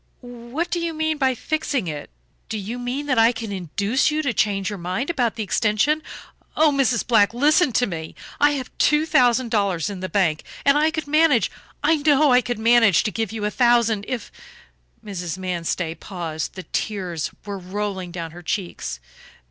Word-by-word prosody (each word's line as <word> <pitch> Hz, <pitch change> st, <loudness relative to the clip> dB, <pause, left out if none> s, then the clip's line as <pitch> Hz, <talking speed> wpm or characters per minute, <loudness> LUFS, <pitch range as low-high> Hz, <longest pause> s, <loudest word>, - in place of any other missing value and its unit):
"What 245 Hz, +7 st, -5 dB
do 350 Hz, -, 0 dB
you 335 Hz, -1 st, -3 dB
mean 315 Hz, -1 st, -1 dB
by 260 Hz, -2 st, +2 dB
fixing 285 Hz, -, -2 dB
it? 150 Hz, -2 st, -5 dB, 0.4 s
Do 220 Hz, -, -3 dB
you 215 Hz, +5 st, -5 dB
mean 250 Hz, +4 st, -3 dB
that 260 Hz, -5 st, +1 dB
I 225 Hz, +1 st, +6 dB
can 225 Hz, -3 st, -6 dB
induce 200 Hz, -, 0 dB
you 310 Hz, 0 st, -1 dB
to 265 Hz, -5 st, 0 dB
change 195 Hz, -3 st, 0 dB
your 205 Hz, -1 st, -4 dB
mind 185 Hz, -, -2 dB
about 245 Hz, -8 st, 0 dB
the 220 Hz, -, -3 dB
extension? 220 Hz, +9 st, +1 dB, 0.6 s
Oh, 310 Hz, -1 st, +5 dB
Mrs. 265 Hz, -4 st, +1 dB
Black, 220 Hz, -2 st, +3 dB
listen 295 Hz, +4 st, +4 dB
to 245 Hz, -, +3 dB
me. 160 Hz, -5 st, -6 dB, 0.2 s
I 290 Hz, 0 st, +4 dB
have 260 Hz, -3 st, -5 dB
two 300 Hz, +1 st, +3 dB
thousand 250 Hz, -5 st, +3 dB
dollars 200 Hz, -4 st, 0 dB
in 195 Hz, -, -6 dB
the 185 Hz, 0 st, -4 dB
bank 170 Hz, -6 st, +1 dB, 0.2 s
and 280 Hz, -, +5 dB
I 305 Hz, +2 st, +3 dB
could 315 Hz, -2 st, -4 dB
manage, 305 Hz, -4 st, +3 dB, 0.3 s
I 315 Hz, +2 st, +4 dB
know 290 Hz, -1 st, +4 dB
I 250 Hz, 0 st, +6 dB
could 245 Hz, 0 st, -3 dB
manage, 225 Hz, -4 st, +4 dB
to 215 Hz, -, -1 dB
give 225 Hz, -1 st, -2 dB
you 220 Hz, -2 st, -3 dB
a 210 Hz, -, -1 dB
thousand 235 Hz, -4 st, +3 dB
if 250 Hz, -5 st, -4 dB, 0.4 s
" -, -, -35 dB
Mrs. 180 Hz, -4 st, -4 dB
Manstey 175 Hz, -2 st, -2 dB
paused; 165 Hz, -4 st, -5 dB
the 185 Hz, -, -7 dB
tears 180 Hz, -8 st, -3 dB, 0.2 s
were 200 Hz, -1 st, -5 dB
rolling 190 Hz, 0 st, -4 dB
down 170 Hz, -2 st, -6 dB
her 175 Hz, +2 st, -11 dB
cheeks. 175 Hz, -, -4 dB
225 Hz, 190 wpm, -22 LUFS, 190-275 Hz, 0.6 s, I